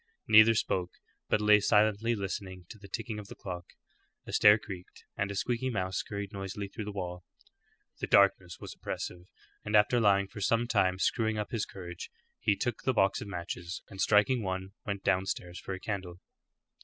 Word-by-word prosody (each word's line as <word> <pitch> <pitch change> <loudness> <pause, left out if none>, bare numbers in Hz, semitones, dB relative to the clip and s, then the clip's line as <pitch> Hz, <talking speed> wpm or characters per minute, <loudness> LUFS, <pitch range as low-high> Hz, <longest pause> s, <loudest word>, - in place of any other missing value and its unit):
Neither 110 +1 +8
spoke, 90 -4 -1 0.4
but - - +3
lay 105 0 +6
silently 105 +3 +3
listening 95 -2 -5
to 110 - -11
the 100 - -12
ticking 110 +1 -4
of 105 - -9
the - - -10
clock. 90 -2 -7 0.6
A - - -8
stair 105 0 +7
creaked, 95 -4 -10
and 100 - -1
a 100 - -4
squeaky 120 +5 -1
mouse 95 -5 -2
scurried 100 0 -4
noisily 100 +1 -5
through 105 +1 -6
the 105 - -4
wall. 90 -3 -5 0.8
The - - -3
darkness 95 -3 +3
was - - -8
oppressive, 90 0 -6 0.4
and 105 - -1
after 105 +4 +5
lying 100 -3 +4
for 105 - -9
some 115 +4 +2
time 95 -6 +2
screwing 110 +2 +1
up 105 -1 -3
his 115 -3 -1
courage, 90 -2 -8 0.3
he 105 -2 +2
took 120 +1 -2
the 130 - +1
box 95 -4 +2
of - - -6
matches, 85 -1 -5
and 95 -1 -5
striking 110 +4 +4
one, 95 -1 -3 0.2
went 100 -1 -3
downstairs 90 -1 -1
for 95 - -5
a - - -8
candle. 95 -4 -5
100 Hz, 185 wpm, -30 LUFS, 95-110 Hz, 0.8 s, Neither